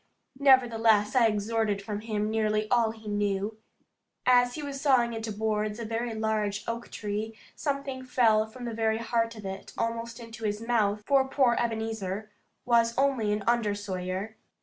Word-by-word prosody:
Nevertheless 230 -5 +4
I 240 -3 +6
extorted 210 -1 0
from 205 +1 -5
him 215 -1 -2
nearly 215 -1 +1
all 235 -2 +4
he 220 -1 -10
knew. 205 +1 -1 0.7
As 245 -1 +4
he 300 - -5
was 275 -1 -5
sawing 250 -5 +3
into 225 -1 -4
boards 215 0 -1
a 230 - -5
very 230 +1 -2
large 215 -2 -1
oak 235 +1 -4
tree, 215 +1 -4 0.2
something 275 -3 -3
fell 225 -4 +3
from 245 +3 -9
the 235 - -4
very 220 0 +1
heart 230 0 -1
of 215 -2 -10
it 190 0 -7
almost 230 0 -3
into 230 -1 -10
his 210 -1 -1
mouth, 215 -3 +1
for 270 -1 +3
poor 260 -3 +3
Ebenezer 220 -3 -3 0.3
was 235 -1 +3
only 265 -6 +2
an 210 0 0
undersawyer. 205 -3 -1
225 Hz, 160 wpm, -28 LUFS, 210-235 Hz, 0.7 s, I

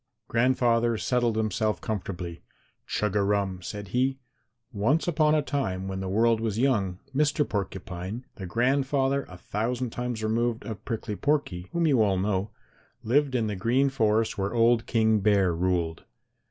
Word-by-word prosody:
Grandfather 120 -1 +2
settled 120 -1 +1
himself 110 -2 0
comfortably. 90 -4 -5 0.5
"Chug 105 -2 -1
a 105 - +3
rum!" 100 -2 0
said 100 +2 -6
he. 130 +5 +1 0.6
"Once 115 - +1
upon 155 -2 +3
a 150 - +2
time 95 -11 -2
when 95 0 -4
the 95 -1 -3
world 115 +3 +3
was 110 -2 -1
young, 110 -8 +1 0.2
Mr. 150 0 +2
Porcupine, 95 +2 -4
the 95 - -7
grandfather 135 +4 +1
a 90 - -10
thousand 120 +6 -2
times 120 -2 -4
removed 115 +1 0
of 110 -3 -6
Prickly 110 -2 -3
Porky, 120 -11 -1
whom 170 -1 +1
you 135 -7 +4
all 100 -3 +3
know, 95 +1 0 0.5
lived 135 +3 +2
in 115 -3 +1
the 105 -1 -2
Green 120 +8 +2
Forest 110 -5 +1
where 100 +4 -1
old 115 0 +3
King 110 -2 +3
Bear 100 -3 +3
ruled. 85 -1 -1
110 Hz, 155 wpm, -27 LUFS, 95-125 Hz, 0.6 s, you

